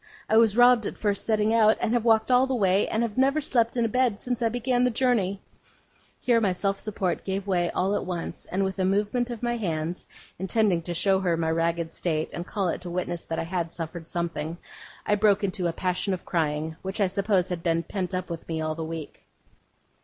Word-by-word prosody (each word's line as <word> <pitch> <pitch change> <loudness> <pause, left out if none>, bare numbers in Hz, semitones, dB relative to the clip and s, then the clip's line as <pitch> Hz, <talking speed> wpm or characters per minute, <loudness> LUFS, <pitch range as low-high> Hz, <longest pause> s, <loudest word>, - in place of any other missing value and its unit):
I - - +2
was 225 -1 +5
robbed 245 -3 +6
at - - -6
first 205 -2 -1
setting 215 0 +2
out, 220 -1 +5
and 225 - 0
have 240 -2 +1
walked 225 +1 +3
all 250 +1 +5
the 265 - 0
way, 195 -3 +2
and 220 - 0
have 230 +1 -2
never 275 +3 +3
slept 240 -5 +1
in 235 - +2
a - - +2
bed 240 -2 +1
since 245 -1 -3
I 230 - +2
began 245 +1 0
the 250 - +4
journey.' 225 -6 0 0.8
Here 235 -2 +2
my 195 -4 +2
self 195 +2 -1
support 195 -4 -2
gave 195 0 -3
way 175 -3 +1
all 190 +2 0
at - - -1
once; 175 -2 -5
and 190 +2 -1
with 190 0 -3
a - - +2
movement 205 +6 +1
of 240 -1 -6
my 240 0 0
hands, 170 -4 -3 0.3
intended 190 -3 +1
to 175 - -3
show 190 +2 +3
her 175 -3 +1
my 160 -1 0
ragged 165 0 -1
state, 160 -3 -2
and 175 - -5
call 195 -3 -1
it - - -3
to 180 - -7
witness 175 -1 -3
that 165 - -4
I - - -1
had 170 -1 -3
suffered 165 0 -5
something, 170 -2 -3 0.5
I - - +2
broke 205 -1 +3
into 185 -2 -1
a - - 0
passion 185 +3 -1
of 180 - -12
crying, 160 -1 -1
which 190 +2 -5
I 200 - +4
suppose 195 -1 +1
had 175 -2 -3
been 165 -1 +1
pent 185 +1 -3
up 185 0 -3
within 165 0 -5
me - - -2
all 155 0 -1
the 165 +1 -5
week. 160 -2 -7
190 Hz, 230 wpm, -26 LUFS, 170-225 Hz, 0.8 s, robbed